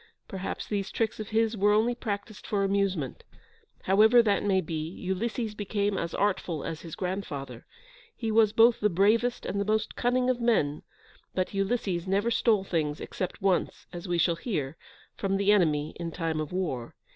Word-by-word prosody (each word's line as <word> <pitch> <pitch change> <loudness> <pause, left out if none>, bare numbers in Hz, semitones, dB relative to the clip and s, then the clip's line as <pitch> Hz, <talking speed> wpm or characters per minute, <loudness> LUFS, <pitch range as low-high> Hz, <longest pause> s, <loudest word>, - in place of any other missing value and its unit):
Perhaps 190 0 -5
these 200 -2 -2
tricks 225 -1 -1
of 215 - -5
his 225 +1 +1
were 205 0 +3
only 225 +3 +3
practised 210 -3 -5
for 200 -2 0
amusement; 195 -8 -1 0.6
however 220 +5 +6
that 205 -3 +2
may 195 -2 +3
be, 160 -2 -3
Ulysses 210 +5 -3
became 205 -1 -1
as 170 -3 -3
artful 185 -6 0
as 160 - -5
his 165 -2 -8
grandfather; 180 -7 -5 0.5
he 225 -2 -2
was 215 -1 +5
both 230 +2 +5
the 210 - +3
bravest 215 +7 +2
and 200 - -1
the 205 +1 0
most 220 0 0
cunning 250 +1 +1
of 250 -1 +1
men, 155 -11 +2 0.5
but 185 +1 -1
Ulysses 195 -3 -1
never 200 +5 +1
stole 220 -3 +3
things, 155 -5 -1
except 185 +1 -5
once, 190 -3 0
as 175 +2 -7
we 175 -1 0
shall 170 0 +2
hear, 160 - -3 0.4
from 195 -1 -1
the 200 +1 +3
enemy 155 -7 +2
in 170 -1 -3
time 165 -2 -2
of 155 -1 -4
war. 160 -11 -3
195 Hz, 175 wpm, -28 LUFS, 170-215 Hz, 0.6 s, however